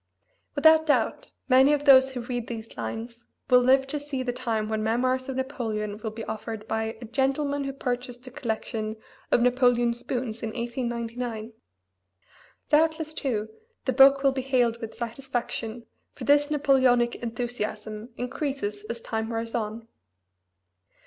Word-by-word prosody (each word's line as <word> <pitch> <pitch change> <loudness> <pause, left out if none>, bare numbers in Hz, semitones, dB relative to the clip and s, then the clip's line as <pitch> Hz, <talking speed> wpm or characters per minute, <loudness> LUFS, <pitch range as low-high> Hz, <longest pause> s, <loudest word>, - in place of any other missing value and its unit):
Without 315 +2 +6
doubt 290 - +1 0.2
many 265 +2 +6
of 290 0 -1
those 265 -1 +7
who 245 - -2
read 240 -1 -4
these 225 -1 -7
lines 225 - -6 0.2
will 250 - +8
live 265 +2 +4
to 290 +2 -3
see 285 -2 -4
the 245 -1 -2
time 230 -4 -2
when 215 0 -1
memoirs 255 +4 0
of 265 - -3
Napoleon 220 -6 -3
will 220 - -3
be 220 +1 -7
offered 220 0 -6
by 220 0 -2
"a 240 - -8
gentleman 275 +4 0
who 275 - -2
purchased 250 -2 -4
a 255 - -9
collection 220 -4 -3 0.4
of 240 - +4
Napoleon 245 -1 +3
spoons 240 -1 -4
in 225 - -2
1899"; 235 -1 -4 1.1
doubtless, 315 +1 +2
too, 220 -8 -2 0.4
the 260 - +1
book 275 +2 +7
will 275 - +5
be 265 0 -2
hailed 245 -3 +1
with 225 -1 -6
satisfaction, 235 -1 -4 0.3
for - - -8
this 290 +1 +4
Napoleonic 260 -5 +3
enthusiasm 225 -2 -4
increases 245 -5 -3
as 235 +1 -5
time 220 0 -3
wears 230 0 -3
on. 225 0 -3
245 Hz, 150 wpm, -26 LUFS, 225-270 Hz, 1.1 s, will